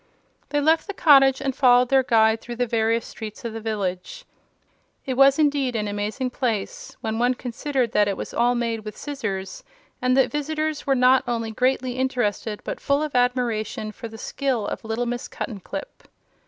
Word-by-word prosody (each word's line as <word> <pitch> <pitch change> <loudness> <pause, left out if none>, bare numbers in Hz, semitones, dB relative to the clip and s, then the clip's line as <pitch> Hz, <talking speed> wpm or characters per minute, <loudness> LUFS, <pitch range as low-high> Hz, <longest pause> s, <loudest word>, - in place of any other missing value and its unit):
They 290 - +1
left 315 +5 +2
the 405 - -5
cottage 270 -5 +6
and 270 -2 -1
followed 250 -2 +5
their 270 -1 +5
guide 220 -2 +3
through 240 - -7
the 245 +1 0
various 230 0 0
streets 215 0 -9
of 230 - -4
the 225 - -6
village. 210 - -4 0.8
It 260 - -1
was 275 +1 +5
indeed 285 -5 +1
an 210 -2 -1
amazing 210 +5 -3
place, 260 - -3
when 225 -1 -2
one 245 +1 +2
considered 250 0 -2
that 210 -3 +3
it 200 - -1
was - - -6
all 245 +1 +2
made 230 -2 -1
with 215 -1 -9
scissors, 200 -10 -5 0.4
and 255 +1 +2
the 265 - +5
visitors 305 0 -3
were 270 - +3
not 255 +1 +5
only 230 -2 -2
greatly 255 +1 0
interested 225 -5 -1
but - - -5
full 280 +1 +1
of 305 - -4
admiration 245 -4 0
for 230 - -8
the 225 0 -11
skill 255 -2 -2
of - - -5
little 225 +2 -2
Miss 240 +1 -3
Cuttenclip. 230 - -7
245 Hz, 180 wpm, -23 LUFS, 220-270 Hz, 0.8 s, cottage